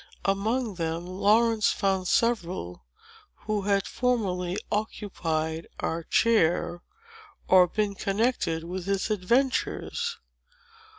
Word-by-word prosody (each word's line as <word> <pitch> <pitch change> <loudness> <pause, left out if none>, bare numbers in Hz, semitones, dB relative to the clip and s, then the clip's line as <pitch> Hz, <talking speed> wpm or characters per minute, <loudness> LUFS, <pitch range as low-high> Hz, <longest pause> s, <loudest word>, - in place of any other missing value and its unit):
Among 215 +4 0
them 165 -1 -3
Laurence 215 +4 +3
found 190 -2 0
several 175 - 0 0.6
who 215 -1 0
had 200 -1 +2
formerly 195 -8 -1
occupied 165 -7 -2
our 165 +1 -2
chair, 175 -5 +2 0.7
or 185 -1 +6
been 205 +2 -1
connected 195 -4 0
with 180 +2 -5
its 200 +2 0
adventures. 265 - 0
195 Hz, 95 wpm, -27 LUFS, 175-220 Hz, 0.7 s, or